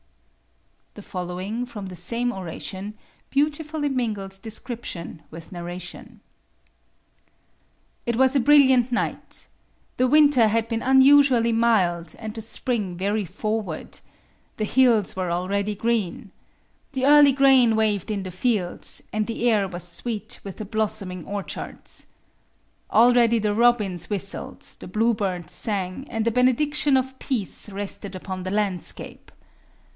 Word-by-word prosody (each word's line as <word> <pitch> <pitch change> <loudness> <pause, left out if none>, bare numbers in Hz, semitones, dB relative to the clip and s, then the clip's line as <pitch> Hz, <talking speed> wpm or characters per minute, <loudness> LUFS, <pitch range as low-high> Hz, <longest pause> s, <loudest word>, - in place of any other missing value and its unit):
The - - -10
following, 185 +6 -4
from 215 -5 -8
the 185 -1 -8
same 235 +8 -1
oration, 190 +3 -6 0.3
beautifully 300 +1 -1
mingles 210 -8 -2
description 220 -7 -6
with 165 +1 -11
narration: 175 0 -8 1.8
It 235 -1 -1
was 265 +1 +3
a 275 - +4
brilliant 260 -3 +5
night. 245 - -3 0.5
The 255 - +3
winter 285 -4 +5
had 225 +1 +1
been 230 -1 -2
unusually 265 -3 +5
mild, 185 -8 +1
and 220 -2 -6
the 225 - -6
spring 220 -4 -3
very 205 +3 0
forward. 200 -1 -4 0.6
The 215 - -1
hills 230 -4 +3
were 185 -2 -2
already 200 +4 -1
green. 215 -3 -2 0.6
The 260 -1 -1
early 290 0 +7
grain 265 -4 +5
waved 215 -2 +1
in 200 -2 -2
the 185 - -6
fields, 190 -1 0
and 215 0 -1
the 235 +1 0
air 210 -4 +2
was 175 -1 -5
sweet 220 +5 -4
with 195 -2 -8
the 215 - -6
blossoming 200 -4 -2
orchards. 200 -1 -6 0.8
Already 235 0 +5
the 210 -1 0
robins 210 -7 +2
whistled, 200 -1 -3 0.2
the - - -9
bluebirds 200 -5 -1
sang, 195 +3 -3
and 225 -2 -2
the 230 - +2
benediction 275 +4 +3
of 265 0 -2
peace 225 -5 -2
rested 200 0 -6
upon 185 0 -6
the 185 - -4
landscape. 200 -4 -3
220 Hz, 130 wpm, -24 LUFS, 190-245 Hz, 1.8 s, early